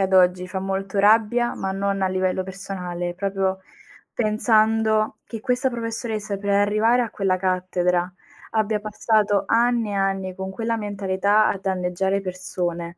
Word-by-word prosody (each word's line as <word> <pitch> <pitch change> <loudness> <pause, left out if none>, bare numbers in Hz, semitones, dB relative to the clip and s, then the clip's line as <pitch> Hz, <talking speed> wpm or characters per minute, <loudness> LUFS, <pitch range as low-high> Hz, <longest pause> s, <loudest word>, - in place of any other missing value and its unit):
ad 190 0 0
oggi 180 0 +4
fa 190 +1 -4
molto 195 +1 -3
rabbia, 225 +4 +3
ma 190 0 -3
non 195 0 -1
a 190 - +2
livello 185 0 0
personale, 180 -2 -5
proprio 190 0 -1 0.5
pensando 220 -1 +2
che 225 -2 -7
questa 255 +1 +1
professoressa 230 -3 -3
per 200 0 -3
arrivare 215 +4 +3
a 230 - -3
quella 195 -2 0
cattedra 180 -1 0 0.4
abbia 215 -1 +1
passato 210 -1 +1
anni 235 -2 +2
e - - -3
anni 195 -1 -1
con 190 0 -5
quella 230 +3 -2
mentalità 205 +1 +1
a 200 - -1
danneggiare 190 +1 -1
persone. 180 -2 -4
195 Hz, 145 wpm, -23 LUFS, 185-215 Hz, 0.5 s, oggi